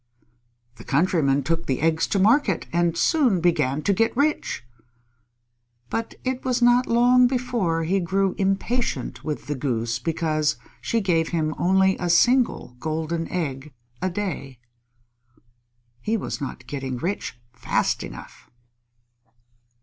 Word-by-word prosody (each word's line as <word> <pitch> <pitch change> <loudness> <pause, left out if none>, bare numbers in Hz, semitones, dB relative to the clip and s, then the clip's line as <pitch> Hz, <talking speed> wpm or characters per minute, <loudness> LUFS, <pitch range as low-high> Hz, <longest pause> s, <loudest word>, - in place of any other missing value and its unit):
The - - -11
Countryman 145 -3 +2
took 165 +4 -2
the 130 - 0
eggs 160 +1 +1
to - - 0
market 210 - +3
and 170 -1 +1
soon 260 - +3
began 155 -4 +1
to 200 - +2
get 225 +4 +1
rich. 290 - 0 1.3
But 225 0 -3
it 260 0 -2
was 255 -1 0
not 245 +1 +4
long 245 +1 +5
before 235 -10 -1
he 190 +5 +1
grew 190 +2 0
impatient 195 - -1
with 150 -1 -4
the 145 - -2
Goose 120 -4 -2
because 155 +1 0 0.3
she 230 - 0
gave 165 -4 +1
him 155 -2 -1
only 190 +1 +3
a 175 - -1
single 240 - +3
golden 160 +3 -2
egg 145 -5 -4 0.3
a 185 - 0
day. 175 -9 -4 1.4
He 220 - -1
was 195 - -5
not 130 -3 -6
getting 130 -1 -4
rich 165 -4 -4
fast 120 -1 0
enough. - - -10
170 Hz, 130 wpm, -24 LUFS, 150-225 Hz, 1.4 s, long